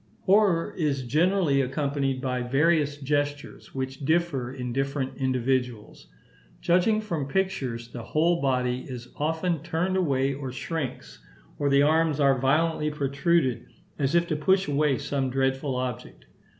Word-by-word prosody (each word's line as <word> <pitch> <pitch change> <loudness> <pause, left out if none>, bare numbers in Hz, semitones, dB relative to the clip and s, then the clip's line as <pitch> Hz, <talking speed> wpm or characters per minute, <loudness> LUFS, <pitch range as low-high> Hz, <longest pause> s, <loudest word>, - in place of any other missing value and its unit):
Horror 190 -4 +3
is 145 -6 -1
generally 155 +1 +2
accompanied 135 0 -1
by 125 -1 -1
various 145 +3 +2
gestures, 145 0 -3
which 135 +1 -4
differ 155 -5 0
in 125 -2 -5
different 135 0 -2
individuals. 125 -3 -1 0.5
Judging 185 +5 +2
from 165 -10 -3
pictures, 135 -9 -2
the 120 0 -7
whole 165 +8 +1
body 125 -2 0
is 125 -1 -7
often 160 +2 -1
turned 170 +3 -1
away 140 -6 +1
or 135 -1 -5
shrinks; 130 - -5 0.4
or 145 - +1
the 140 0 +4
arms 155 0 +2
are 135 -2 +3
violently 150 +3 +1
protruded 140 -1 0 0.3
as 140 +3 +1
if 170 0 +4
to 155 - 0
push 190 +6 +2
away 145 -2 +2
some 135 -2 -2
dreadful 135 +1 0
object. 125 -1 -5
140 Hz, 135 wpm, -26 LUFS, 130-160 Hz, 0.5 s, the